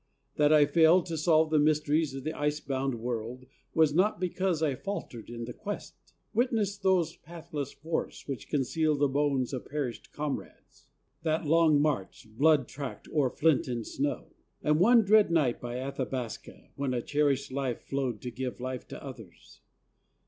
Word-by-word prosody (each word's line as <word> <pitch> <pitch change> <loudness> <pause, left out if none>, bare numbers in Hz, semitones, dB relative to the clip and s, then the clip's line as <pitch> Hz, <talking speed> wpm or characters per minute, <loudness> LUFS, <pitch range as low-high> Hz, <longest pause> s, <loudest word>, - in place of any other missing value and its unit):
That 150 0 +4
I 150 -1 +7
failed 165 +3 +5
To 165 -2 -4
solve 155 0 +3
the 155 - +4
mysteries 150 -1 +2
of 135 - -6
the 155 +2 -2
ice 150 0 -1
bound 135 -2 -2
world, 120 +2 -4 0.3
Was 160 -2 +4
not 185 +3 +2
because 180 -2 0
I 150 -3 +2
faltered 130 - -6
in 120 0 -5
the 125 - -7
quest. 205 -1 -6 0.4
Witness 225 -4 +1
those 190 -4 +1
pathless 150 -4 -6
forests 160 +2 -4
which 135 -6 -5
conceal 150 +2 +1
The 145 0 +2
bones 140 -2 0
of 130 - -5
perished 140 -6 -4
comrades, 150 -1 -6 0.3
that 160 0 0
long 160 -1 +4
march, 145 -9 -1
Blood 145 -1 +4
tracked 140 -2 -7
o'er 145 -4 +2
flint 155 +1 +2
and 120 -3 -3
snow, 145 +1 -3 0.3
and 150 +1 +3
one 230 +5 +6
dread 210 0 +5
night 150 -8 +1
By 120 0 -4
Athabasca, 130 -3 -5
when 135 -2 -1
a 120 - -2
cherished 140 -2 +1
life 130 -3 -2
Flowed 130 -5 -2
to 125 - -5
give 125 0 -5
life 130 0 -5
to - - -9
others. - - -12
145 Hz, 165 wpm, -29 LUFS, 130-160 Hz, 0.4 s, I